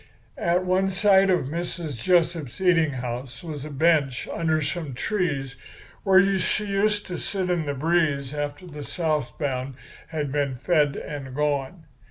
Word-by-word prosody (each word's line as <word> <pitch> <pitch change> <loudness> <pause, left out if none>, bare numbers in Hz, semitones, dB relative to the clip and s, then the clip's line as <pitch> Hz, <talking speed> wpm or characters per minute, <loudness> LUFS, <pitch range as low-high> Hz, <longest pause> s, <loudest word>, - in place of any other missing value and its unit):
"At 175 +2 +1
one 185 +1 +2
side 195 0 +4
of 180 -7 +2
Mrs. 165 0 -4
Jessup's 170 -6 +1
eating 180 -4 +4
house 125 +1 -5
was 150 -5 -6
a 155 - -6
bench 145 -3 +2
under 160 -1 +1
some 150 -2 -3
trees 140 - -1 0.5
where 195 0 +4
she 210 - 0
used 205 +1 +1
to 180 - -5
sit 185 -2 -2
in 170 -4 0
the 145 - -1
breeze 150 -2 +1
after 145 +3 -4
the 150 -4 -8
south 150 -7 -2
bound 135 -3 -2 0.3
had 150 -4 -3
been 140 -2 0
fed 145 +1 +2
and 140 -3 -6
gone. 150 +2 -1
155 Hz, 155 wpm, -25 LUFS, 140-180 Hz, 0.5 s, side